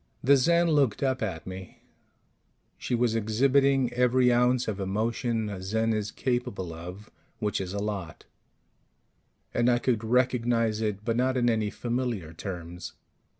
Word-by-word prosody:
The 140 Hz, +2 st, +6 dB
Zen 170 Hz, +5 st, +3 dB
looked 140 Hz, -7 st, +2 dB
up 130 Hz, -1 st, 0 dB
at 95 Hz, -7 st, -3 dB
me. 95 Hz, 0 st, -9 dB, 1.0 s
She 125 Hz, -, -1 dB
was 120 Hz, -1 st, +1 dB
exhibiting 130 Hz, +4 st, +2 dB
every 125 Hz, 0 st, +3 dB
ounce 125 Hz, +1 st, +2 dB
of 105 Hz, -2 st, -3 dB
emotion 110 Hz, +3 st, -1 dB
a 100 Hz, -3 st, -6 dB
Zen 110 Hz, +4 st, 0 dB
is 105 Hz, -1 st, -2 dB
capable 105 Hz, -9 st, -2 dB
of, 90 Hz, +6 st, -9 dB, 0.3 s
which 105 Hz, -3 st, -1 dB
is 90 Hz, -1 st, -5 dB
a 100 Hz, -, -4 dB
lot; 100 Hz, -6 st, -4 dB, 1.3 s
and 120 Hz, +1 st, +2 dB
I 120 Hz, -, +4 dB
could 120 Hz, -2 st, 0 dB
recognize 115 Hz, -2 st, +1 dB
it, 105 Hz, -1 st, -2 dB
but 115 Hz, -1 st, 0 dB
not 130 Hz, +1 st, +1 dB
in 120 Hz, -1 st, +3 dB
any 110 Hz, -2 st, 0 dB
familiar 120 Hz, -9 st, -3 dB
terms. 90 Hz, 0 st, -7 dB
115 Hz, 150 wpm, -27 LUFS, 100-125 Hz, 1.3 s, The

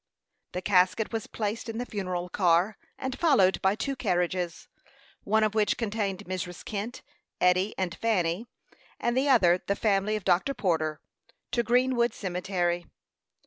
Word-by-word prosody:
The 180 Hz, +1 st, -4 dB
casket 195 Hz, +3 st, +2 dB
was 225 Hz, -2 st, -3 dB
placed 220 Hz, +1 st, -3 dB
in 225 Hz, -, -4 dB
the 245 Hz, -, -2 dB
funeral 185 Hz, -5 st, -3 dB
car, 180 Hz, +2 st, +2 dB, 0.2 s
and 260 Hz, 0 st, -4 dB
followed 260 Hz, -, +4 dB
by 190 Hz, +1 st, +3 dB
two 275 Hz, +5 st, -2 dB
carriages, 180 Hz, -6 st, -1 dB, 0.6 s
one 220 Hz, +2 st, +3 dB
of 215 Hz, -1 st, +1 dB
which 215 Hz, -1 st, +2 dB
contained 205 Hz, -3 st, -2 dB
Mrs. 180 Hz, -1 st, -5 dB
Kent, 215 Hz, +4 st, -5 dB, 0.4 s
Eddy, 185 Hz, +3 st, +3 dB
and 185 Hz, -2 st, -1 dB
Fanny, 195 Hz, -1 st, 0 dB, 0.5 s
and 240 Hz, 0 st, 0 dB
the 270 Hz, +2 st, +2 dB
other 185 Hz, -9 st, +5 dB
the 200 Hz, -, +1 dB
family 205 Hz, 0 st, +1 dB
of 210 Hz, -, -5 dB
Dr. 190 Hz, +11 st, +2 dB
Porter, 160 Hz, -8 st, 0 dB, 0.5 s
to 240 Hz, -, +2 dB
Greenwood 245 Hz, +1 st, +2 dB
Cemetery. 180 Hz, -2 st, -2 dB
200 Hz, 145 wpm, -28 LUFS, 180-225 Hz, 0.6 s, other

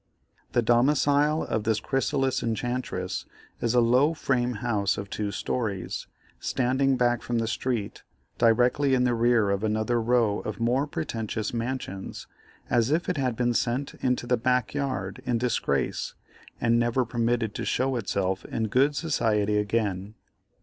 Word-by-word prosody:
The 120 Hz, -, +3 dB
domicile 145 Hz, +5 st, +3 dB
of 110 Hz, -, -2 dB
this 110 Hz, -1 st, +1 dB
chrysalis 135 Hz, +1 st, 0 dB
enchantress 120 Hz, +2 st, -3 dB, 0.3 s
is 120 Hz, 0 st, +1 dB
a -, -, +6 dB
low 130 Hz, +7 st, +3 dB
frame 125 Hz, -4 st, 0 dB
house 105 Hz, -3 st, 0 dB
of 100 Hz, -1 st, -6 dB
two 105 Hz, -1 st, -2 dB
stories, 100 Hz, -3 st, -3 dB, 0.3 s
standing 130 Hz, +1 st, +1 dB
back 120 Hz, -1 st, +2 dB
from 120 Hz, -, -2 dB
the 115 Hz, -1 st, 0 dB
street, 115 Hz, -2 st, -2 dB, 0.4 s
directly 125 Hz, +4 st, +3 dB
in 125 Hz, -, +2 dB
the 125 Hz, -1 st, +2 dB
rear 115 Hz, -3 st, +3 dB
of 100 Hz, +1 st, -1 dB
another 110 Hz, +2 st, +1 dB
row 115 Hz, -3 st, +2 dB
of 110 Hz, -, -5 dB
more 125 Hz, +5 st, +1 dB
pretentious 110 Hz, -, -3 dB
mansions, 115 Hz, -5 st, -4 dB, 0.4 s
as 120 Hz, -1 st, +2 dB
if 160 Hz, +5 st, +1 dB
it 180 Hz, -, -1 dB
had 130 Hz, -4 st, 0 dB
been 120 Hz, +1 st, +1 dB
sent 125 Hz, +4 st, -1 dB
into 125 Hz, -1 st, 0 dB
the 125 Hz, 0 st, +2 dB
back 125 Hz, +1 st, +1 dB
yard 130 Hz, -10 st, -3 dB
in 120 Hz, -2 st, 0 dB
disgrace 115 Hz, -, -1 dB, 0.4 s
and 120 Hz, 0 st, +3 dB
never 120 Hz, +2 st, +1 dB
permitted 115 Hz, -2 st, 0 dB
to -, -, -4 dB
show 130 Hz, +1 st, 0 dB
itself 95 Hz, -4 st, -1 dB
in 110 Hz, -1 st, -2 dB
good 135 Hz, +6 st, +3 dB
society 105 Hz, -10 st, +1 dB
again. 105 Hz, -1 st, -1 dB
120 Hz, 150 wpm, -26 LUFS, 110-130 Hz, 0.4 s, a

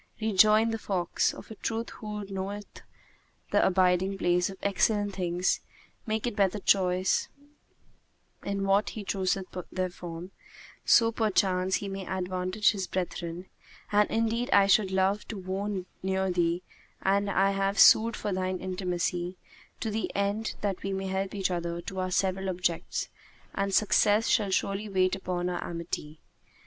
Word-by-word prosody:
Rejoined 215 Hz, +1 st, +4 dB
the 225 Hz, -, -2 dB
fox, 185 Hz, -5 st, 0 dB
"Of -, -, -11 dB
a -, -, -7 dB
truth 230 Hz, +1 st, -3 dB
whoso 210 Hz, -2 st, -7 dB
knoweth 200 Hz, +2 st, -6 dB, 0.7 s
the -, -, +4 dB
abiding 185 Hz, +1 st, +2 dB
place 175 Hz, -1 st, +2 dB
of 190 Hz, -, -9 dB
excellent 205 Hz, 0 st, +1 dB
things, 180 Hz, -1 st, 0 dB, 0.5 s
maketh 220 Hz, +1 st, -1 dB
better 200 Hz, -1 st, +2 dB
choice 185 Hz, -2 st, +2 dB, 1.2 s
in 200 Hz, 0 st, -2 dB
what 195 Hz, +2 st, +3 dB
he 210 Hz, -, -4 dB
chooseth 190 Hz, -1 st, -1 dB, 0.3 s
therefrom, 180 Hz, -1 st, -5 dB, 0.5 s
so 230 Hz, -1 st, +5 dB
perchance 190 Hz, -4 st, +1 dB
he 200 Hz, -, -3 dB
may 195 Hz, -1 st, -5 dB
advantage 185 Hz, +2 st, 0 dB
his 195 Hz, -4 st, -4 dB
brethren; 175 Hz, -1 st, -4 dB, 0.5 s
and 210 Hz, 0 st, +4 dB
indeed 230 Hz, +2 st, 0 dB
I 200 Hz, -, +6 dB
should 200 Hz, 0 st, +4 dB
love 190 Hz, +2 st, +1 dB
to 220 Hz, -, -6 dB
wone 190 Hz, 0 st, -3 dB, 0.2 s
near 190 Hz, 0 st, 0 dB
thee 175 Hz, 0 st, 0 dB, 0.4 s
and 200 Hz, +1 st, +2 dB
I 195 Hz, 0 st, +3 dB
have 195 Hz, +1 st, 0 dB
sued 225 Hz, 0 st, +7 dB
for 205 Hz, -, -3 dB
thine 185 Hz, 0 st, -1 dB
intimacy, 180 Hz, -1 st, -2 dB, 0.4 s
to 220 Hz, -, -2 dB
the 220 Hz, +1 st, -2 dB
end 200 Hz, +2 st, -1 dB
that 200 Hz, -3 st, -2 dB
we 195 Hz, 0 st, -3 dB
may 190 Hz, 0 st, -3 dB
help 190 Hz, +1 st, -2 dB
each 190 Hz, -2 st, 0 dB
other 170 Hz, -1 st, -2 dB
to 190 Hz, +2 st, -6 dB
our 185 Hz, 0 st, -1 dB
several 190 Hz, +1 st, 0 dB
objects; 175 Hz, -2 st, -2 dB, 0.4 s
and 195 Hz, 0 st, -1 dB
success 210 Hz, +2 st, +3 dB
shall 210 Hz, -4 st, +2 dB
surely 195 Hz, +2 st, -1 dB
wait 185 Hz, -1 st, +2 dB
upon 180 Hz, -2 st, -3 dB
our 175 Hz, -1 st, -2 dB
amity. 165 Hz, -2 st, -5 dB
190 Hz, 150 wpm, -28 LUFS, 185-205 Hz, 1.2 s, sued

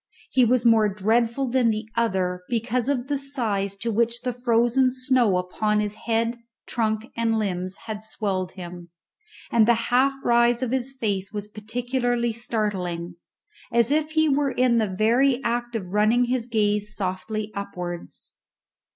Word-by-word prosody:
He 255 Hz, -, +4 dB
was 240 Hz, 0 st, +3 dB
more 220 Hz, -2 st, +5 dB
dreadful 230 Hz, +6 st, +1 dB
than 250 Hz, -2 st, +3 dB
the 215 Hz, 0 st, -2 dB
other 185 Hz, -6 st, 0 dB
because 240 Hz, +1 st, 0 dB
of 260 Hz, -2 st, -1 dB
the 285 Hz, -1 st, -1 dB
size 215 Hz, -8 st, -2 dB
to 230 Hz, +3 st, -2 dB
which 235 Hz, +2 st, +1 dB
the 250 Hz, -1 st, -2 dB
frozen 240 Hz, +1 st, +2 dB
snow 255 Hz, -6 st, +2 dB
upon 210 Hz, +4 st, 0 dB
his 210 Hz, -1 st, -1 dB
head, 230 Hz, +1 st, 0 dB, 0.3 s
trunk, 220 Hz, -1 st, -2 dB
and 230 Hz, -1 st, +1 dB
limbs 185 Hz, -3 st, -2 dB
had 215 Hz, -2 st, -5 dB
swelled 195 Hz, -4 st, -3 dB
him; 175 Hz, -2 st, -9 dB, 0.6 s
and 225 Hz, -2 st, +4 dB
the 235 Hz, -, +5 dB, 0.2 s
half 265 Hz, +2 st, +4 dB
rise 235 Hz, +1 st, +3 dB
of 245 Hz, -, -2 dB
his 260 Hz, 0 st, -1 dB
face 200 Hz, -7 st, -2 dB
was 205 Hz, -1 st, -5 dB
particularly 240 Hz, +2 st, -1 dB
startling, 185 Hz, -7 st, -3 dB, 0.5 s
as 235 Hz, +2 st, +3 dB
if 310 Hz, +1 st, +1 dB
he 315 Hz, 0 st, +3 dB
were 285 Hz, -1 st, +2 dB
in 250 Hz, -3 st, +2 dB
the 215 Hz, -2 st, 0 dB
very 240 Hz, +7 st, +3 dB
act 240 Hz, 0 st, -2 dB
of 190 Hz, -4 st, -4 dB
running 220 Hz, +4 st, +3 dB
his 245 Hz, -1 st, -1 dB
gaze 210 Hz, -2 st, 0 dB
softly 210 Hz, +3 st, -3 dB
upwards. 180 Hz, -3 st, -7 dB
230 Hz, 155 wpm, -24 LUFS, 205-245 Hz, 0.6 s, more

